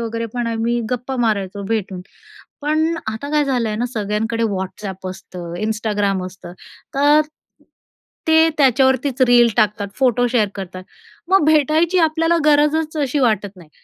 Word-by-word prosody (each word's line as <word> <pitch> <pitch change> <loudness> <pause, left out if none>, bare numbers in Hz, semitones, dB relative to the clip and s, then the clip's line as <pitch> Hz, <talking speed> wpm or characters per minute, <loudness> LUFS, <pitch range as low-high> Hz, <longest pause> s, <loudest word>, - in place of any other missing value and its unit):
वगैरे 230 0 -3
पण 240 -1 -2
आम्ही 230 +1 -1
गप्पा 250 +2 -3
मारायचो 200 -2 -2
भेटून. 200 -5 -2 0.6
पण 310 +3 +1
आता 220 +6 -4
काय 300 -1 +3
झालं 250 -5 0
आहे 210 - -3
ना, 240 - -1
सगळ्यांकडे 220 +2 -2
WhatsApp 190 -2 -4
असतं, 180 -2 -9
Instagram 205 -3 -1
असतं 180 -1 -10 0.4
तर 290 +2 +5 1.1
ते 320 0 +5
त्याच्यावरतीच 265 0 +2
रील 240 -1 +6
टाकतात. 210 -2 +1
फोटो 245 -2 +2
शेअर 235 -3 +1
करतात. 185 -1 -7 0.5
मग 385 -4 +4
भेटायची 315 +4 +3
आपल्याला 330 +1 +2
गरजच 300 +1 +2
अशी 285 -1 0
वाटत 215 -6 +1
नाही 170 -4 -15
235 Hz, 140 wpm, -19 LUFS, 205-290 Hz, 1.1 s, रील